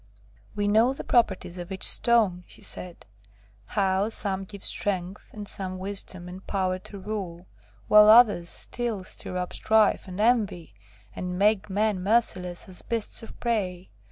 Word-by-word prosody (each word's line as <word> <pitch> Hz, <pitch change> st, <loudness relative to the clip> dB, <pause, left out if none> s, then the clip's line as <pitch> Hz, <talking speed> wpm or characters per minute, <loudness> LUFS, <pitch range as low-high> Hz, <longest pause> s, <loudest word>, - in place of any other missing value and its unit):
"We 205 Hz, -1 st, 0 dB
know 225 Hz, +5 st, +4 dB
the -, -, -6 dB
properties 185 Hz, -6 st, +1 dB
of 175 Hz, +2 st, -7 dB
each 190 Hz, -, -4 dB
stone," 215 Hz, -7 st, +3 dB
he -, -, -17 dB
said; 180 Hz, -2 st, -6 dB, 0.6 s
"how 195 Hz, -, +1 dB
some 195 Hz, -3 st, -1 dB
give 200 Hz, 0 st, -10 dB
strength, 190 Hz, -1 st, -2 dB
and 210 Hz, -2 st, -8 dB
some 185 Hz, -2 st, -3 dB
wisdom 185 Hz, -2 st, -4 dB
and 185 Hz, +1 st, -9 dB
power 185 Hz, -2 st, -1 dB
to 200 Hz, -, -10 dB
rule, 190 Hz, -3 st, -6 dB, 0.4 s
while 210 Hz, 0 st, +8 dB
others 215 Hz, -7 st, +6 dB
still 235 Hz, -5 st, -2 dB
stir 185 Hz, 0 st, -5 dB
up 180 Hz, 0 st, -3 dB
strife 220 Hz, -2 st, +2 dB
and 185 Hz, +1 st, -7 dB
envy, 210 Hz, -, +1 dB, 0.4 s
and 180 Hz, 0 st, -4 dB
make 210 Hz, +1 st, +2 dB
men 205 Hz, -1 st, 0 dB
merciless 185 Hz, -4 st, 0 dB
as 185 Hz, -1 st, -7 dB
beasts 230 Hz, -2 st, -3 dB
of 225 Hz, -, -12 dB
prey. 190 Hz, -6 st, -2 dB
195 Hz, 155 wpm, -26 LUFS, 185-215 Hz, 0.6 s, while